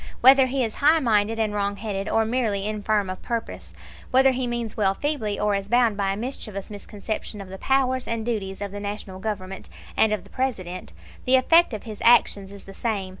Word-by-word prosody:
Whether 265 +1 +7
he 260 0 0
is 220 -2 -4
highminded 230 -8 +3
and 220 -2 0
wrongheaded 200 0 -2
or 225 0 +2
merely 220 -4 0
infirm 210 -1 0
of 185 0 -6
purpose, 90 - -5 0.4
whether 265 +1 +5
he 255 -1 -2
means 235 -2 -3
well 195 -3 +2
feebly 240 -9 -2
or 210 0 +1
is 195 0 -2
bound 240 -2 +3
by 200 -1 0
a 195 - -3
mischievous 215 -4 -6
misconception 210 +1 -6
of 195 -2 -8
the 190 0 -8
powers 260 -1 +1
and 230 -1 -2
duties 200 -5 -3
of 200 -1 -4
the 205 - -6
National 205 -2 -6
Government 195 -2 -5 0.3
and 220 - +4
of 210 -4 -1
the 200 - -18
President, 185 -9 -3 0.3
the 255 - +5
effect 330 +6 +5
of 215 -3 -5
his 215 -3 -8
actions 200 -4 +4
is 200 -1 -11
the 195 - -11
same. 200 -4 -2
215 Hz, 200 wpm, -24 LUFS, 200-240 Hz, 0.4 s, Whether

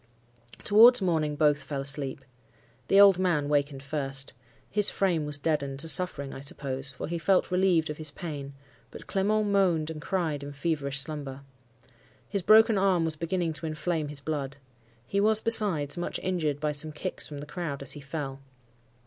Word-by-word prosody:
Towards 235 +4 +7
morning 160 -6 0
both 150 -1 +2
fell 140 0 -5
asleep. 135 -1 0 0.6
The 195 - +4
old 200 -2 +7
man 160 -6 0
wakened 140 -2 -1
first. 135 -2 -3 0.4
His 210 -1 +7
frame 170 -6 0
was 145 -1 0
deadened 140 -2 -2
to 165 - -5
suffering, 145 -3 +2
I - - -8
suppose, 135 -1 -2
for 125 - -6
he 170 +1 -4
felt 185 +2 +1
relieved 180 -3 +2
of 150 - -7
his 155 -1 -1
pain; 145 -3 -7 0.4
but - - -11
Clement 210 +2 0
moaned 175 -6 +1
and 155 -1 -8
cried 165 -5 -2
in 140 0 -8
feverish 145 -2 -2
slumber. 140 -2 -3 0.9
His 200 -1 -2
broken 220 +2 +5
arm 185 -4 +2
was 160 -1 -2
beginning 170 +1 -2
to 160 +1 -6
inflame 155 0 -2
his 145 -1 -6
blood. 140 -3 -4 0.5
He 200 +10 -1
was, 215 +1 +3
besides, 185 -11 +2
much 175 - -3
injured 160 -6 -1
by 150 0 -1
some 150 +2 -1
kicks 150 - -6
from 145 - -8
the 145 - -7
crowd 150 -3 -5
as 135 - +1
he 145 - -5
fell. 140 -2 -6
155 Hz, 175 wpm, -27 LUFS, 140-180 Hz, 0.9 s, Towards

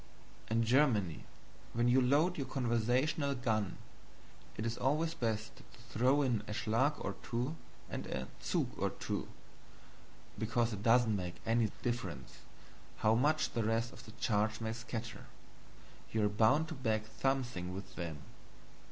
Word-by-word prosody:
In 115 +1 +2
Germany, 115 - +3 0.5
when 120 +1 +2
you 125 +2 +5
load 150 +8 +3
your 135 -4 -3
conversational 130 +4 +1
gun 110 -6 0 0.8
it 110 - -2
is 115 0 -1
always 155 +5 +1
best 110 -5 -2
to - - -14 0.3
throw 130 +5 +3
in 120 -6 +1
a 105 - -3
SCHLAG 125 +6 +2
or 100 - -1
two 120 +6 -2 0.3
and - - -5
a 65 -1 -3
ZUG - - 0
or - - +2
two, - - -4 1.1
because 115 +1 +1
it 100 - -5
doesn't 115 -1 +4
make 90 -3 -3
any 115 -1 +3
difference 95 - -3 0.7
how 110 - +6
much 150 +6 +2
the 115 - 0
rest 115 +2 0
of - - -12
the 110 - -10
charge 110 -2 +1
may 110 -1 -2
scatter, 120 -1 -6 0.8
you 110 -1 +2
are - - +3
bound 115 +10 +4
to - - -4
bag 110 -6 0 0.2
something 125 -10 0
with 95 +1 -7
THEM. 85 -4 -4
115 Hz, 150 wpm, -34 LUFS, 110-130 Hz, 1.1 s, how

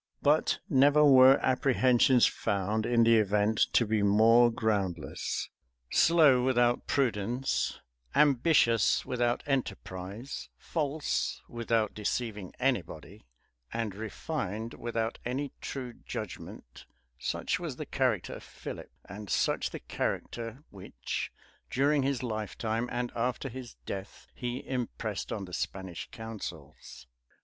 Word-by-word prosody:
But 150 +2 +3
never 145 -1 +5
were 130 -1 +8
apprehensions 130 -1 +4
found 105 +3 -1
in 120 -1 +4
the 115 0 +6
event 105 +1 +2
to 120 - +4
be 110 0 +1
more 115 +4 +6
groundless. 100 -6 -2 0.4
Slow 150 -7 +5
without 120 -2 +2
prudence, 125 0 0 0.4
ambitious 135 -5 +4
without 120 -1 0
enterprise, 110 -3 -4
false 150 -2 -2
without 115 -2 0
deceiving 105 -2 -3
any 125 -4 +2
body, 80 -6 -13 0.4
and 115 -3 -2
refined 110 - -4
without 115 -1 -3
any 135 +3 -3
true 125 -3 -5
judgment; - - -8 0.3
such - - -1
was - - -5
the - - -6
character - - 0
of - - -9
Philip, - - -8 0.2
and 100 +1 -9
such - - +1
the - - -7
character 115 +4 -4
which, 95 -10 -5 0.4
during 140 +2 +2
his 135 -2 -1
lifetime, 110 +1 -2
and 120 0 -2
after 125 +3 -1
his 125 -1 -9
death, 95 0 -7
he 125 +1 -5
impressed 115 -5 -3
on 100 -3 -3
the 90 - -12
Spanish 95 -1 -4
councils. 85 - -8
115 Hz, 115 wpm, -30 LUFS, 105-130 Hz, 0.4 s, were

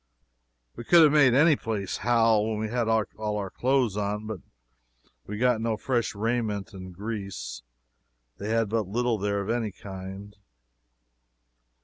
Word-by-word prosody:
We - - -7
could 170 +7 +6
have 150 - +6
made 140 -5 +5
any 150 +3 +6
place 105 -6 -3
howl 115 -2 +3
when 110 - -2
we 110 0 -2
had 120 0 -1
all 110 -1 -1
our 100 -2 -4
clothes 130 -5 +1
on. 105 -1 -3 0.9
We 105 - -5
got 120 -1 +2
no 115 -1 -1
fresh 120 -2 -1
raiment 110 -1 -2
in 95 -1 -9
Greece 100 - -6 0.8
they 105 - -4
had 115 0 +1
but 110 -1 -1
little 120 +2 0
there 100 0 -1
of 100 +3 -2
any 115 -3 -1
kind. 95 +1 -9
110 Hz, 145 wpm, -27 LUFS, 100-120 Hz, 0.9 s, could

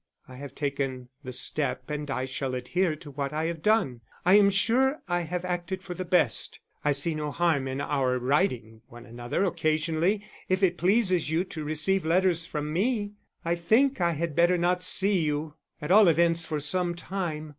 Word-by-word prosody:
I 130 -1 -11
have 140 0 -9
taken 135 -3 -3
the 130 - -6
step, 130 +1 -2
and 150 -1 -4
I 130 -1 -2
shall 130 0 -3
adhere 155 +7 0
to 150 -1 -12
what 140 0 -3
I 155 +1 -1
have 165 -1 -3
done. 195 - +1 0.2
I 180 - +5
am 205 -1 +7
sure 250 +8 +2
I 175 -1 0
have 175 +2 -4
acted 180 +1 -3
for 180 - -6
the 185 - -5
best. 180 0 +1 0.2
I 150 - +2
see 145 +4 +1
no 150 -1 -3
harm 155 -4 +1
in 130 +1 -4
our 135 -3 0
writing 125 - 0
to - - -32
one 120 0 -12
another 120 +8 -3
occasionally 165 +3 0 0.2
if 185 +1 +1
it 175 -2 +2
pleases 185 -4 +2
you 160 +3 +1
to 165 -4 -7
receive 155 +6 0
letters 170 0 +2
from 150 -2 -4
me. 205 +2 0 0.3
I 170 - +1
think 225 +8 +2
I 170 -1 +2
had 160 -1 -3
better 175 +1 +4
not 180 +1 +1
see 195 +1 +2
you, 150 -1 -2 0.3
at 150 - -2
all 210 0 +7
events 165 0 +2
for 155 -1 -2
some 175 +4 0
time. 170 -4 -4
165 Hz, 195 wpm, -27 LUFS, 145-185 Hz, 0.3 s, am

